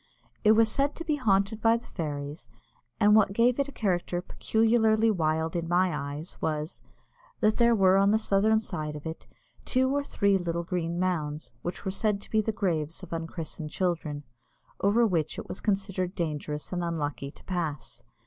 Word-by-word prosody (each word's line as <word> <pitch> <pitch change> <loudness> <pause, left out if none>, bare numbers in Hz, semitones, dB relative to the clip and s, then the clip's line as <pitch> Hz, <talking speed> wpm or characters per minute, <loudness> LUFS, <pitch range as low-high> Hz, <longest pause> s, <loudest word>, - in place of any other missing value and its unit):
It 215 0 +7
was 225 0 +5
said 275 +6 0
to 335 - -7
be 305 -2 +1
haunted 210 -3 +1
by 230 0 +4
the 235 - -12
fairies, 145 -2 -5 0.5
and 210 -1 +6
what 200 -2 +4
gave 240 +4 +3
it 280 - +1
a - - -8
character 180 -6 -1
peculiarly 220 +3 +2
wild 160 -3 0
in 170 -1 -2
my 175 -1 +2
eyes 145 +3 -5
was, 155 +1 -2 0.6
that 215 -2 +2
there 235 -1 +5
were 190 -2 +5
on 195 0 +4
the 215 - +4
southern 215 0 +3
side 155 -8 -4
of 150 - -9
it 160 0 -6 0.4
two 260 +2 +1
or 285 - +1
three 200 -7 +2
little 170 -1 -2
green 170 -1 -2
mounds, 160 -5 -2
which 175 +3 -5
were 190 - 0
said 205 +1 0
to - - -14
be 220 - +3
the 220 - -1
graves 165 -7 -2
of - - -8
unchristened 165 -1 -5
children, 160 -4 -2 0.6
over 215 +4 +4
which 165 -7 0
it - - -6
was - - -4
considered 195 -3 -1
dangerous 150 -2 -3
and 175 -1 -1
unlucky 150 -4 -3
to - - -17
pass. 165 -6 -4
185 Hz, 185 wpm, -28 LUFS, 160-220 Hz, 0.6 s, It